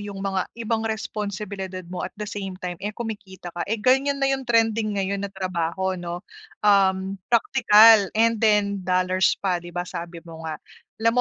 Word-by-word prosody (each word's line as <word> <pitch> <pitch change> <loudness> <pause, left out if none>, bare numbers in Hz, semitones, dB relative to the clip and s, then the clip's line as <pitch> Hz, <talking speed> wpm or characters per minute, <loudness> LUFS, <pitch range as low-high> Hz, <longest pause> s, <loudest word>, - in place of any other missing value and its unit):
'yong 205 -1 -7
mga 195 -2 -1
ibang 225 0 -1
responsibilidad 200 -3 -4
mo 180 - -4
at - - -11
the 210 - -4
same 195 -3 -5
time, 180 -1 -4
eh, 210 +2 -3
kumikita 205 -6 -7
ka. 175 - -7
Eh, 225 - +1
ganiyan 270 +5 +3
na 275 - +3
'yong 270 0 -2
trending 225 -2 +2
ngayon 195 0 -1
na - - -3
trabaho, 185 0 -2
'no, 175 0 -6 0.4
um 195 -1 +3
praktikal 225 -3 +6
and 230 0 +3
then 205 -2 +2
dollars 185 +1 +2
pa, 180 -3 0
'di 175 - -10
ba, 175 0 -2
sabi 170 0 -7
mo 165 -1 -10
nga. 155 - -4 0.5
Alam 230 0 +4
200 Hz, 175 wpm, -24 LUFS, 185-220 Hz, 0.5 s, praktikal